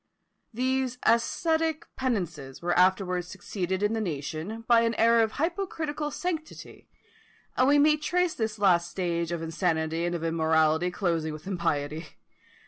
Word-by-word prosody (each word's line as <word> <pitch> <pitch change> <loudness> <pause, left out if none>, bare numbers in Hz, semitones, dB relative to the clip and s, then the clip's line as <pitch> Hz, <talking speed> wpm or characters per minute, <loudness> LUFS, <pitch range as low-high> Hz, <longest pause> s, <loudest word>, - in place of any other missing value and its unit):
These 255 +1 -1
ascetic 320 +7 +1
penances 175 - -3
were 175 +1 0
afterwards 180 -1 +2
succeeded 190 0 -4
in 210 +1 +2
the 225 - -1
nation 165 +5 -4
by 235 -1 +6
an 230 0 +1
era 230 0 +4
of 220 - -2
hypocritical 320 -3 -2
sanctity; 320 0 -6 0.7
and 255 - +3
we 290 +1 +5
may 300 +1 +5
trace 345 +3 0
this 220 -1 -3
last 175 -4 +3
stage 170 -2 -2
of 170 -1 -3
insanity 165 -1 -1
and 175 0 -1
of 165 - -4
immorality 160 +1 +2
closing 170 -4 -1
with 155 +2 -10
impiety. 165 -4 -2
190 Hz, 140 wpm, -27 LUFS, 165-260 Hz, 0.7 s, by